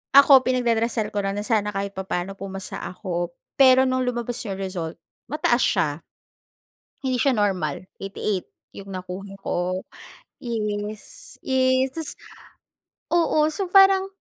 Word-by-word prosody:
ako, 280 -1 +9
pinagdarasal 235 -3 +1
ko 205 - 0
lang 195 - -1
na - - -1
sana 215 -3 +1
kahit 200 0 -2
papa'no 190 0 -3
pumasa 195 -1 -6
ako. 175 -2 -4 0.3
Pero 260 -1 +7
no'ng 255 0 0
lumabas 240 -1 -2
'yung 195 -1 -3
result, 175 -4 -4 0.3
mataas 275 -5 +2
siya, 160 -6 +2 1.2
hindi 260 -1 +1
siya 275 +3 +3
normal, 185 -6 -1 0.2
88 195 -1 -2 0.3
'yung 200 0 -9
nakuha 185 +2 -7
ko. 180 +1 -1 0.6
Yes, 215 - -5
yes, 260 0 +2
Tas, 320 -2 -4 1.0
oo, 330 -3 +3
so 380 +4 -3
parang 390 0 +6
210 Hz, 125 wpm, -24 LUFS, 190-260 Hz, 1.2 s, ako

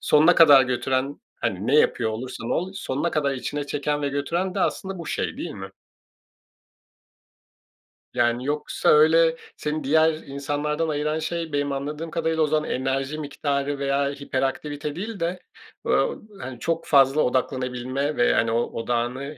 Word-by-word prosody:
sonuna 160 +4 +5
kadar 145 -5 +8
götüren, 130 +2 -1 0.2
hani, 95 +2 -2
ne 140 - +2
yapıyor 115 -6 +3
olursan 115 +1 -5
ol, 185 +3 -1
sonuna 145 +1 -2
kadar 140 -3 0
içine 145 +2 -4
çeken 145 +1 -2
ve 145 - +1
götüren 170 +7 -2
de 195 - -1
aslında 190 +1 -1
bu 165 - -7
şey, - - -2
değil 170 - -5
mi? 95 -5 -8 2.4
Yani, 120 +1 +1
yoksa 150 +1 -1
öyle 160 +2 +5 0.2
seni 150 0 -3
diğer 160 +3 +4
insanlardan 145 +2 -3
ayıran 150 +1 -1
şey 165 -1 -3
benim 145 0 0
anladığım 150 +4 -4
kadarıyla 160 -1 0
o - - +2
zaman 155 0 0
enerji 135 +3 -1
miktarı 140 -1 -2
veya 140 0 +1
hiperaktivite 145 +1 -3
değil 205 +2 -5
de, 175 +2 -2 0.5
böyle, 485 - +1 0.2
hani, 130 -2 -7
çok 165 0 -2
fazla 140 +1 +5
odaklanabilme 130 +2 -1
ve, 120 - +4
yani, 115 0 +2
o, 115 - +2 0.2
odağını, 125 +5 -2
145 Hz, 150 wpm, -24 LUFS, 135-155 Hz, 2.4 s, kadar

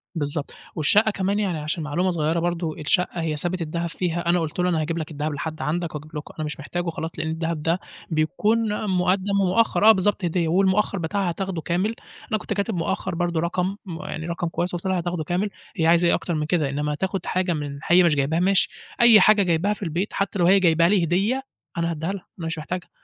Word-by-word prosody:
بالضبط، 145 -1 -3 0.2
والشقة 210 +8 +4
كمان 200 +1 -1
يعني 190 -6 -1
عشان 155 +2 -3
معلومة 170 +5 0
صغيرة 160 0 0
برضه، 170 -2 -2
الشقة 170 +3 +1
هي 160 -2 -1
سابت 175 +3 -1
الدهب 170 +2 -2
فيها 170 0 -2
أنا 175 +1 +4
قُلت 160 +1 -4
له 180 0 +2
أنا 165 -3 +1
هاجيب 165 +2 -2
لك 160 -1 -4
الدهب 150 +1 -3
لحد 155 0 -5
عندك، 160 +3 -2
وأجيب 155 +1 -8
لك 150 - -3 0.2
أنا 155 - -1
مش 150 +2 -5
محتاجُه 175 +4 -3
خلاص 160 0 -5
لأن 160 - -2
الدهب 160 -1 -3
ده 165 +3 +1 0.3
بيكون 210 +7 0
مُقدَّم 190 +2 +1
ومؤخّر 205 +3 +2
آه - - +12
بالضبط، 205 -1 +1
هدية 170 0 0
والمؤخّر 195 +4 +2
بتاعها 180 +3 -1
هاتاخدُه 180 -1 -3
كامل، 185 +9 -1 0.4
أنا 215 - +2
كُنت 215 - -4
كاتب 200 +1 -1
مؤخّر 175 +2 -2
برضه 175 -1 0
رقم 180 +3 -1
م 175 -2 -6
يعني 160 -4 -5
رقم 170 0 -2
كويس، 175 +2 -2
قُلت 175 - -6
لها 190 -1 +1
هاتاخدُه 175 -1 -2
كامل، 180 +6 -1 0.3
هي 160 -4 +1
عايزة 170 +1 +5
إيه - - +4
أكتر 175 - -3
من 150 -1 -1
كده، 155 -3 +1
إنّما 150 +2 -2
تاخد 190 +2 -3
حاجه 185 -1 0
من 145 -2 -4
هي 180 +2 +6
مش 165 -3 +4
جايباها 145 +4 +1
ماشي 190 +2 +3 0.3
أي 235 -3 +8
حاجه 210 -2 +6
جايباها 175 +4 +1
في 210 - -8
البيت 175 +4 -2
حتّى 200 0 -2
لو 175 - +4
هي 195 +3 +6
جايباها 170 -2 +4
لي 195 -3 +3
هدية 205 +11 +1 0.3
أنا 170 0 0
هادّيها 165 +4 -3
لها، 195 -3 -8
أنا 165 - -3
مش 165 0 -3
محتاجها 175 +3 -5
175 Hz, 225 wpm, -23 LUFS, 160-190 Hz, 0.4 s, آه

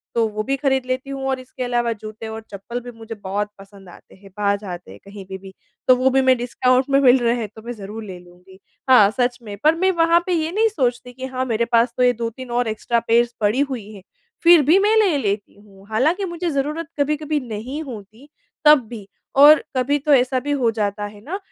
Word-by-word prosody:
तो 230 -1 +2
वो 215 0 -2
भी 275 +3 -1
ख़रीद 265 -2 0
लेती 255 +2 -3
हूँ 270 -1 -5
और 265 -1 -1
इसके 255 0 -7
अलावा 240 -1 0
जूते 215 +1 -9
और 220 0 -6
चप्पल 205 +5 -6
भी 245 - -9
मुझे 225 0 -8
बहुत 205 +1 -3
पसंद 195 -1 -15
आते - - -17
हैं 195 +1 -17
बाहर 200 -1 +1
जाते 180 -4 -9
हैं - - -13
कहीं 200 -1 -10
पे 190 0 -7
भी। 190 0 -13 0.3
तो 255 - +7
वो 255 +1 +2
भी 265 +1 +2
मैं 260 0 +4
डिस्काउंट 255 +2 +1
में 275 0 +4
मिल 260 -1 +6
रहे 235 0 +1
हैं 220 - -3
तो 220 - -11
मैं 240 - -4
ज़रूर 215 +1 -8
ले 190 -3 -8
लूँगी। 180 +2 -18 0.3
हाँ, 210 -6 +7
सच 245 +1 0
में, 210 -3 -8
पर 310 +2 +5
मैं 375 +3 +2
वहाँ 335 -1 +3
पे 365 - -1
ये 320 -1 -1
नहीं 440 +4 +2
सोचती 250 - -2
कि 260 +1 -7
हाँ 260 0 -3
मेरे 230 -1 0
पास 235 0 +2
तो 250 - +2
ये 250 0 +4
2-3 235 +2 -6
और 240 -1 0
एक्स्ट्रा 225 +2 -1
पेयर्स 235 +1 +2
पड़ी 210 +5 +1
हुई 255 -7 -2
है। 200 - -12 0.4
फ़िर 340 -2 +7
भी 320 +7 +4
मैं 420 +2 +3
ले 385 -9 +3
लेती 205 -4 -3
हूँ 195 -2 -19
हालाँकि 310 - +1
मुझे 345 -1 -3
ज़रूरत 300 +3 -2
कभी-कभी 300 +1 0
नहीं 250 +8 -5
होती 225 +1 -11 0.4
तब 295 -7 +6
भी। 215 -5 -9 0.3
और 295 +3 +7
कभी 280 +3 +1
तो 295 +1 +2
ऐसा 255 0 +3
भी 290 +3 -4
हो 235 - +4
जाता 205 -1 -2
है 205 0 -11
ना 355 - -4
245 Hz, 235 wpm, -21 LUFS, 210-275 Hz, 0.4 s, तो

